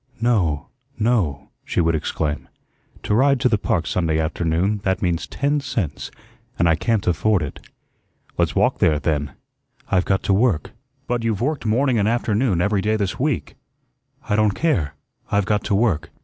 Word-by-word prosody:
"No, 95 Hz, -, +1 dB, 0.3 s
no," 100 Hz, -, 0 dB
she -, -, -2 dB
would 85 Hz, -1 st, +3 dB
exclaim. 75 Hz, -1 st, -2 dB, 0.6 s
"To -, -, -1 dB
ride 135 Hz, +4 st, +4 dB
to 130 Hz, -, +4 dB
the 110 Hz, -4 st, +2 dB
park 85 Hz, -4 st, 0 dB
Sunday 80 Hz, -2 st, 0 dB
afternoon, 85 Hz, +5 st, 0 dB
that 95 Hz, -1 st, 0 dB
means 85 Hz, -2 st, 0 dB
ten 145 Hz, +2 st, 0 dB
cents, 115 Hz, -, -3 dB, 0.5 s
and 85 Hz, -, +3 dB
I 85 Hz, -, +5 dB
can't 110 Hz, +3 st, 0 dB
afford 90 Hz, +1 st, +2 dB
it." 70 Hz, -, -6 dB, 0.8 s
"Let's -, -, 0 dB
walk -, -, +2 dB
there, 75 Hz, -, +3 dB
then." 75 Hz, -3 st, -1 dB, 0.6 s
"I've 90 Hz, -2 st, +3 dB
got 95 Hz, -1 st, +1 dB
to 100 Hz, -, +2 dB
work." 100 Hz, -6 st, +1 dB, 0.3 s
"But 120 Hz, -1 st, -1 dB
you've 110 Hz, -4 st, 0 dB
worked 140 Hz, -2 st, -1 dB
morning 120 Hz, +2 st, +2 dB
and 100 Hz, -, +2 dB
afternoon 110 Hz, -4 st, +1 dB
every 100 Hz, +1 st, +1 dB
day 110 Hz, +2 st, +1 dB
this 100 Hz, -4 st, -2 dB
week." 145 Hz, -1 st, -1 dB, 0.7 s
"I 105 Hz, -, +1 dB
don't 105 Hz, -2 st, +2 dB
care, 90 Hz, -, 0 dB, 0.3 s
I've 100 Hz, -1 st, +1 dB
got 105 Hz, 0 st, 0 dB
to 100 Hz, -, +1 dB
work." 90 Hz, -7 st, +1 dB
100 Hz, 170 wpm, -22 LUFS, 85-115 Hz, 0.8 s, I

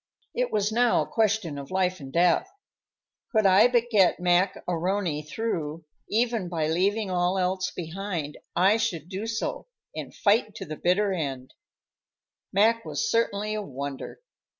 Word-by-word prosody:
It -, -, -1 dB
was 210 Hz, 0 st, +1 dB
now 240 Hz, +1 st, +3 dB
a -, -, -10 dB
question 215 Hz, -9 st, 0 dB
of 140 Hz, -, -9 dB
life 185 Hz, -1 st, 0 dB
and 135 Hz, -2 st, -9 dB
death. 175 Hz, -, +3 dB, 0.8 s
Could 220 Hz, -3 st, +2 dB
I 195 Hz, +4 st, +7 dB
but 240 Hz, -1 st, +1 dB
get 195 Hz, -6 st, +4 dB
Mac 180 Hz, +2 st, +3 dB
A'Rony 175 Hz, -2 st, -1 dB
through, 165 Hz, -8 st, -3 dB, 0.2 s
even 225 Hz, -4 st, 0 dB
by 165 Hz, -3 st, -1 dB
leaving 195 Hz, +5 st, +1 dB
all 180 Hz, +1 st, +1 dB
else 185 Hz, +1 st, 0 dB
behind, 170 Hz, -3 st, -5 dB, 0.2 s
I 195 Hz, +5 st, +4 dB
should 180 Hz, -8 st, -2 dB
do 195 Hz, +3 st, -4 dB
so 225 Hz, -, -3 dB, 0.3 s
and -, -, -6 dB
fight 215 Hz, 0 st, +1 dB
to -, -, -6 dB
the 155 Hz, -, -6 dB
bitter 195 Hz, +5 st, +1 dB
end. 135 Hz, -7 st, -4 dB, 1.0 s
Mac 225 Hz, +4 st, +3 dB
was 220 Hz, 0 st, -2 dB
certainly 215 Hz, -2 st, 0 dB
a 215 Hz, -, -2 dB
wonder. 140 Hz, -6 st, -6 dB
190 Hz, 150 wpm, -26 LUFS, 170-220 Hz, 1.0 s, I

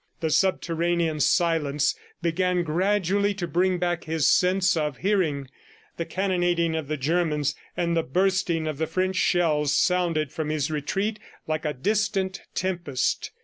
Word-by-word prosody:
The 160 Hz, -1 st, -1 dB
subterranean 170 Hz, -3 st, +1 dB
silence 150 Hz, -2 st, +2 dB, 0.3 s
began 180 Hz, +1 st, +1 dB
gradually 200 Hz, +4 st, +1 dB
to 185 Hz, -3 st, -3 dB
bring 185 Hz, +2 st, +1 dB
back 175 Hz, -1 st, -1 dB
his 160 Hz, -1 st, +1 dB
sense 185 Hz, 0 st, +3 dB
of 150 Hz, -4 st, -1 dB
hearing. 170 Hz, -9 st, 0 dB, 0.5 s
The 170 Hz, -, -2 dB
cannonading 175 Hz, -2 st, 0 dB
of 160 Hz, -3 st, -3 dB
the 155 Hz, +1 st, -2 dB
Germans 150 Hz, 0 st, 0 dB, 0.2 s
and 170 Hz, -1 st, 0 dB
the 165 Hz, -, +3 dB
bursting 180 Hz, +1 st, 0 dB
of 155 Hz, -2 st, -4 dB
the 160 Hz, -, 0 dB
French 185 Hz, +2 st, -1 dB
shells 155 Hz, -6 st, +2 dB
sounded 165 Hz, -3 st, +1 dB
from 155 Hz, -1 st, -3 dB
his 155 Hz, 0 st, -1 dB
retreat 195 Hz, +8 st, -2 dB, 0.3 s
like 155 Hz, 0 st, -2 dB
a 150 Hz, -, 0 dB
distant 195 Hz, -, -1 dB
tempest. 170 Hz, -9 st, -1 dB
170 Hz, 145 wpm, -25 LUFS, 155-185 Hz, 0.5 s, sense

